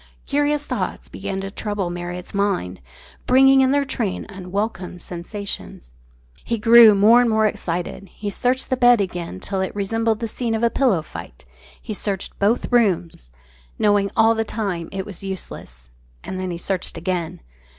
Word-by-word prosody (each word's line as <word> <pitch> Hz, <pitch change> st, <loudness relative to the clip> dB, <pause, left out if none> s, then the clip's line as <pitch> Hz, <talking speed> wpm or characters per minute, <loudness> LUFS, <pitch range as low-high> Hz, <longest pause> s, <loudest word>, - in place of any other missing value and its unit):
Curious 290 Hz, +1 st, 0 dB
thoughts -, -, -4 dB
began 195 Hz, 0 st, -4 dB
to 195 Hz, 0 st, -6 dB
trouble 205 Hz, -3 st, -3 dB
Marriott's 175 Hz, 0 st, -6 dB
mind, 195 Hz, -, -1 dB, 0.5 s
bringing 270 Hz, +1 st, +6 dB
in 260 Hz, -, +4 dB
their 285 Hz, +1 st, +3 dB
train 235 Hz, -7 st, -2 dB
unwelcome 190 Hz, -1 st, -4 dB
sensations. 175 Hz, -, -6 dB, 0.5 s
He 230 Hz, -, -1 dB
grew 225 Hz, 0 st, +8 dB
more 220 Hz, +5 st, +6 dB
and 245 Hz, -, +2 dB
more 220 Hz, 0 st, +3 dB
excited; 180 Hz, -1 st, -3 dB
he 205 Hz, -1 st, -5 dB
searched 255 Hz, +6 st, 0 dB
the 260 Hz, -, +2 dB
bed 245 Hz, -2 st, +6 dB
again 175 Hz, -, -3 dB
till 195 Hz, -, -3 dB
it 190 Hz, -, -3 dB
resembled 225 Hz, +2 st, 0 dB
the 230 Hz, -, -2 dB
scene 230 Hz, 0 st, -2 dB
of 220 Hz, -, -2 dB
a 235 Hz, -, +3 dB
pillow 225 Hz, -, +2 dB
fight; -, -, -10 dB, 0.3 s
he 215 Hz, -, -6 dB
searched 200 Hz, -2 st, -4 dB
both 215 Hz, +6 st, +1 dB
rooms, 180 Hz, -, +1 dB, 0.5 s
knowing 205 Hz, -1 st, +2 dB
all 225 Hz, 0 st, +5 dB
the 225 Hz, 0 st, 0 dB
time 195 Hz, -7 st, -3 dB
it 195 Hz, -1 st, -4 dB
was 200 Hz, -2 st, -8 dB
useless, -, -, -7 dB, 0.3 s
and 185 Hz, -, -5 dB
then 185 Hz, 0 st, -3 dB
he 170 Hz, -, -4 dB
searched 185 Hz, 0 st, -3 dB
again. 170 Hz, -1 st, -3 dB
200 Hz, 165 wpm, -21 LUFS, 180-230 Hz, 0.5 s, grew